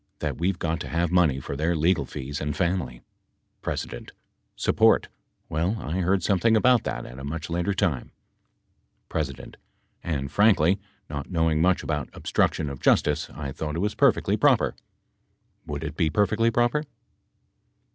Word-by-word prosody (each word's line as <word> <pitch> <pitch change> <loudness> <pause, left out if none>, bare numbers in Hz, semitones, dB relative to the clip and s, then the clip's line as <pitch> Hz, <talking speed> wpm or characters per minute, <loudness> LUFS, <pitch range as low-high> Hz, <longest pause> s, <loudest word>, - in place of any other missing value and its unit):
That - - -3
we've 90 +2 0
got 85 -1 -2
to - - -5
have 85 0 0
money 85 -7 +3
for 70 - -6
their 80 +4 0
legal 80 +2 +2
fees 70 +2 -5
and 75 0 -3
family. 85 -9 -1 0.6
P. - - -1 0.8
Support. - - +3 0.4
Well, 85 +8 -1
I 85 +3 -3
heard 95 0 +1
something 110 +4 +3
about 125 +1 +4
that - - -3
at 65 +2 -10
a - - -8
much 80 +3 -5
later 90 +3 0
time. 90 - -1 1.0
P. - - +2 0.8
And, 70 -4 -3
frankly, 100 -1 +4 0.3
not 70 -1 -6
knowing 80 -3 +1
much 90 +1 +3
about 75 -2 -2
obstruction 80 - 0
of 70 -2 -6
justice, - - +2
I 70 -2 -6
thought 75 +2 -4
it 85 +5 0
was 105 - -1
perfectly - - +3
proper. - - +4
P. - - -27 0.9
Would 75 0 -4
it 75 -1 -5
be 80 -1 +1
perfectly 105 +5 +2
proper? 120 +5 +1
85 Hz, 155 wpm, -25 LUFS, 75-95 Hz, 1.0 s, about